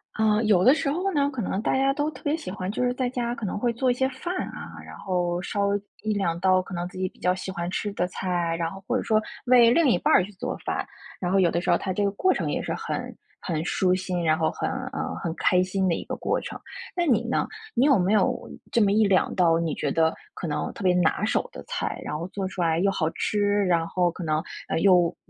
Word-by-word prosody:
呃， 220 0 +2
有 195 -4 +4
的 260 +7 +7
时 295 - -1
候 370 +5 -1
呢， 285 -2 +2
可 265 -5 -4
能 190 - -2
大 250 - +1
家 270 +1 +3
都 290 +2 -1
特 275 - -12
别 295 +1 +1
喜 320 - -7
欢， 185 0 -4
就 235 - -1
是 250 - +2
在 255 -1 0
家 240 -1 -2
可 230 - -5
能 190 - -2
会 240 +2 +1
做 250 +2 +1
一 - - +2
些 265 +2 0
饭 275 +7 -5 0.2
啊， - - -9
然 - - -11
后， 175 -2 -1
烧 200 +2 0 0.3
一 215 - -1
两 170 -5 -1
道 185 0 +4
可 185 +1 -6
能 175 0 -3
自 180 - -11
己 185 0 0
比 - - -26
较 180 0 +2
喜 190 0 -5
欢 175 -2 -3
吃 205 +2 -3
的 180 -2 0
菜， 175 -2 -1
然 165 -1 -1
后 195 +1 -10
或 250 0 +1
者 - - -2
说， 215 -1 +2 0.2
为 245 -2 +7
另 325 +5 +4
一 205 - +4
半 185 - +4
去 200 - -8
做 185 - -4
饭， - - -1 0.4
然 180 -1 -1
后 195 - +4
有 175 -3 +4
的 170 - 0
时 - - -3
候 175 - +5
它 185 - -3
这 205 - 0
个 200 - +3
过 370 - +2
程 - - -2
也 - - -1
是 - - -2
很 - - -4 0.2
很 160 -3 -2
舒 180 +1 +1
心， 185 -1 -2
然 155 -1 +3
后 160 - +2
很， - - -3 0.2
呃， - - -3
很 170 - -1
开 180 - +3
心 190 +1 0
的 175 - +2
一 - - -3
个 - - -4
过 - - -1
程， - - -7 0.4
那 350 - +1
你 260 -8 +3
呢？ - - +1 0.3
你 250 - +4
有 275 -7 +5
没 185 +4 +2
有， 215 - +1 0.2
这 235 - +3
么 200 - +4
一 215 +1 +4
两 195 -2 +2
道 165 -2 +4
你 165 -2 -1
觉 145 - -1
得， 160 +1 +3 0.2
可 170 - -5
能 150 - -2
特 - - -8
别 180 -1 +4
拿 175 -3 +2
手 - - +1
的 - - -8
菜， - - -3
然 150 - -3
后 170 +3 -4
做 195 0 -3
出 185 - -9
来 165 -1 +2
又 200 +3 +3
好 165 -4 0
吃， 210 - -1 0.3
然 170 -2 +2
后 180 0 +1
可 175 +1 -7
能， 155 0 0 0.2
呃， - - 0
又 180 -2 +4
190 Hz, 290 characters per minute, -25 LUFS, 175-235 Hz, 0.4 s, 的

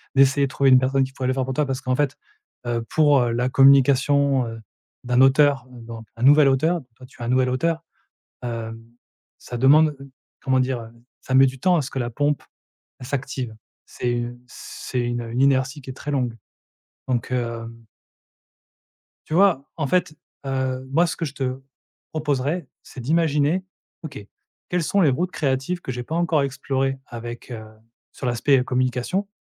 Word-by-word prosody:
d'essayer 135 +1 +5
de - - -11
trouver 135 0 +2
une 130 -1 +7
personne 135 +1 +2
qui 130 0 -5
pourrait 130 - -3
le 130 - +2
faire 130 -1 -1
pour 130 - -3
toi 150 +3 +1
parce 135 -1 -3
qu'en 130 0 0
fait, 145 0 0 0.5
heu, 120 -1 -1
pour, 145 -3 +4
heu, 120 -1 +1
la 120 +2 0
communication, 140 0 +4
heu, 115 0 -7 0.4
d'un 125 +1 +2
auteur, 135 -1 +4
heu, 125 - -11
donc 115 -1 -9
un 115 - -5
nouvel 145 +2 +7
auteur. 160 +6 +1
Toi, 130 - -13
tu 125 - -17
es - - -3
un - - -3
nouvel 130 0 +3
auteur, 165 +6 0 0.6
hem, 115 -1 -5 0.6
ça 120 - -7
demande, 150 +4 +5 0.5
comment 130 -1 +2
dire? 130 -1 0
Heu, 115 - -10 0.3
ça 130 - -5
met 135 +1 +8
du 130 0 -6
temps 180 +6 +3
à 165 - +2
ce 140 - -6
que 135 - -3
la 120 -1 -2
pompe, 145 +4 0 0.6
elle 125 - -9
s'active, 130 -3 -4 0.3
c'est, 120 -1 -2
heu, 120 +1 -6
c'est 125 0 -6
une, 120 0 -1
heu, 115 - -7
une 120 +2 -2
inertie 135 +1 +2
qui 130 - -9
est - - -4
très 145 - -6
longue 125 -5 -1 0.7
donc 120 -2 -1
hem 115 -2 -4 1.4
Tu 155 - -4
vois? 180 -6 +4
En 155 -4 -1
fait, 175 +1 +1 0.3
heu, 130 -1 -2
moi, 165 +6 +3
ce - - -3
que - - -3
je 140 -3 -5
te 130 -2 -3 0.5
proposerai 150 +1 -1 0.2
c'est 130 - -11
d'imaginer. 155 +4 +1 0.4
OK, 160 -3 -7 0.5
quels 180 -1 +1
sont 200 +5 +1
les 155 - +5
routes 175 +8 -1
créatives 140 +3 -1
que 130 - -5
j'ai 125 0 -4
pas 155 - -6
encore 165 -3 +2
explorées 135 0 -1
avec, 120 +1 -8
heu, 110 -2 -6 0.5
sur 135 - -6
l'aspect, 125 +3 +3
heu, 125 - 0
communication 130 +10 -1
135 Hz, 190 wpm, -23 LUFS, 125-145 Hz, 1.4 s, met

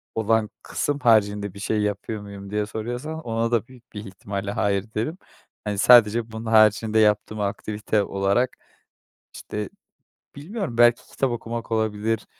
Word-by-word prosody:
olan 110 -1 +1
kısım 145 0 -2
haricinde 105 -5 +3
bir 100 - -11
şey 105 +1 0
yapıyor 105 +1 -3
muyum 100 -1 -9
diye 105 +1 -1
soruyorsan? 120 +9 -5
Ona 115 -3 -1
da 115 -1 +1
büyük 125 -2 -18
bir 105 0 -7
ihtimalle 100 +1 -5
hayır 100 -1 0
derim. 120 +11 -2 0.5
Hani, 105 -1 -1
sadece 115 0 +6
bunun 110 +1 -7
haricinde 110 0 +4
yaptığım 105 0 +2
aktivite 105 +1 -1
olarak, 100 +6 +1 0.9
işte, 105 -1 -5 0.7
bilmiyorum 160 - -5
belki 120 0 +4
kitap 135 -2 0
okumak 115 0 -5
olabilir, 110 0 0
110 Hz, 140 wpm, -24 LUFS, 105-115 Hz, 0.9 s, sadece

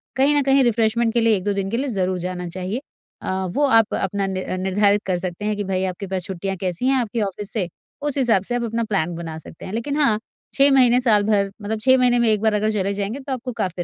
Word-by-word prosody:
कहीं 275 +3 +3
ना 290 - +4
कहीं 270 0 +4
रिफ्रेश्मेन्ट 230 -1 +2
के 235 - +2
लिए 225 -1 +4
1-2 205 +2 -1
दिन 195 -1 -2
के 230 - 0
लिए 275 +3 -1
ज़रूर 185 -4 -1
जाना 180 0 -4
चाहिए। 185 +7 -4 0.4
अ, 190 0 -2
वो 290 +5 +2
आप 225 -4 +4
अपना 195 +1 -1
न 185 -1 -3
निर्धारित 200 +2 +2
कर 185 -2 0
सकते 180 +2 -5
हैं 210 0 0
कि 205 - -2
भाई 190 -1 -1
आपके 195 +2 -7
पास 185 -1 -3
छुट्टियाँ 195 +1 -4
कैसी 185 +7 -1
हैं 270 - +3
आपके 230 0 -2
ऑफिस 200 0 -4
से, 200 -6 -1 0.3
उस 290 -1 -2
हिसाब 235 -8 +3
से 240 - -3
आप 245 - -1
अपना 230 0 -1
प्लान 185 -6 -1
बना 165 -1 -6
सकते 160 - -11
हैं 190 - -7
लेकिन 280 +6 -2
हाँ, 220 -7 +3 0.3
6 275 +1 +5
महीने 250 -2 +5
साल 215 -5 +3
भर 200 -2 +1
मतलब 215 +2 -3
6 260 +3 +5
महीने 245 -1 +3
में 235 -1 +3
1 215 -2 +2
बार 220 -1 +2
अगर 210 +1 +1
चले 200 -2 -1
जाएँगे 205 +6 -3
तो 270 0 -5
आपको 255 0 -4
काफ़ी 180 -5 -2
210 Hz, 255 wpm, -22 LUFS, 190-240 Hz, 0.4 s, 6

